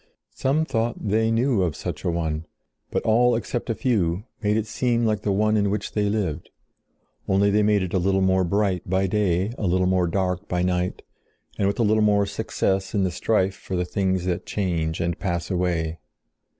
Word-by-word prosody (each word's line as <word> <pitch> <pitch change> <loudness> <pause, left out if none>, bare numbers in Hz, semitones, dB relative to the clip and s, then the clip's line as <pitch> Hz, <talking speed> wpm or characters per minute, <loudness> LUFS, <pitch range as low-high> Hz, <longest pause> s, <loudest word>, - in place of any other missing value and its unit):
Some 145 +4 +1
thought 120 -4 -1
they 110 +2 +2
knew 115 -1 +2
of 85 -5 0
such - - -5
a - - 0
one; 80 -2 -2 0.4
but - - -1
all 120 +2 +4
except 120 +1 -3
a 115 - 0
few 100 -6 0 0.2
made 105 0 +1
it 110 - 0
seem 120 +1 0
like 105 -2 0
the 105 - 0
one 105 +2 +2
in 100 -1 +2
which 100 0 -2
they 105 -1 0
lived—only 100 +1 -3
they 105 +1 +3
made 105 -2 +3
it 90 - -5
a 95 - +2
little 95 +1 +2
more 95 0 +3
bright 95 0 +1
by 95 +1 +2
day, 95 +1 0
a 105 - 0
little 90 +1 +2
more 90 -1 +2
dark 90 +1 -1
by 90 0 0
night, 90 0 -1 0.6
and 100 - +2
with 100 - -1
a 120 - +2
little 110 0 +3
more 105 -1 +3
success 100 -1 -1
in 100 - +2
the 95 - 0
strife 95 +1 +1
for 95 - -6
the 90 0 0
things 95 -1 -1
that 90 -1 -2
change 85 -5 -1
and 85 0 -1
pass 85 -1 -2
away. 85 -3 -1
95 Hz, 200 wpm, -24 LUFS, 90-105 Hz, 0.6 s, all